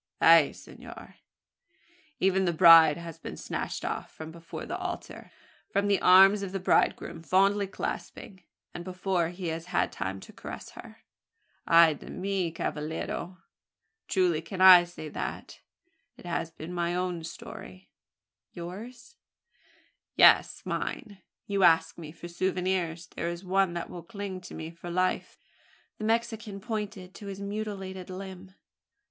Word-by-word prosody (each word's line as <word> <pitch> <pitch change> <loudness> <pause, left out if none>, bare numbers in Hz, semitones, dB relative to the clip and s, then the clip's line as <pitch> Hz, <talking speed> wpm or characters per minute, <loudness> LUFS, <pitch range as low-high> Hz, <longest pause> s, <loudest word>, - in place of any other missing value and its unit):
"Ay - - +7
senor! - - -13 1.0
Even 190 0 +2
the 175 - +2
bride 160 -2 +8
has 165 -1 -9
been - - -8
snatched - - -4
off, - - -4
from 160 0 -9
before 170 0 -8
the - - -4
altar - - -6 0.4
from 200 +1 0
the 200 -1 +2
arms 195 +3 +7
of 195 -2 -4
the 195 - -3
bridegroom 170 -2 +1
fondly 195 +4 +2
clasping, 190 0 -6 0.3
and 175 - -6
before 185 -2 -1
he 175 -1 -5
has 165 +1 -4
had - - 0
time 95 0 -4
to - - -13
caress - - -9
her! - - -13 0.6
Ay 165 -1 +7
de 145 - -12
mi, 190 -2 -2
cavallero! 160 +3 -4 0.7
Truly 180 -4 +1
can 185 +3 -8
I 185 -2 +9
say 175 -3 -9
that: - - -6 0.6
it - - -14
has 170 -1 -2
been 165 +1 -9
my 175 0 -1
own 180 -2 -2
story." 95 - -10 0.6
"Yours?" 230 - -9 1.0
"Yes - - +5
mine. 205 -7 -4 0.2
You 200 -1 -1
ask 165 -2 +4
me 155 -2 -8
for 170 +1 -10
souvenirs. 180 -1 -1
There 170 - -4
is 170 +2 -7
one 190 -1 +1
that 170 - -4
will 175 - -7
cling 195 0 -7
to - - -9
me 160 0 -6
for 170 +1 -10
life!" 185 +1 -1 0.6
The 215 - -3
Mexican 225 -2 -1
pointed 205 -4 -5
to 205 - -10
his 195 -1 -6
mutilated 200 -3 -5
limb. 190 0 -9
180 Hz, 145 wpm, -28 LUFS, 170-195 Hz, 1.0 s, I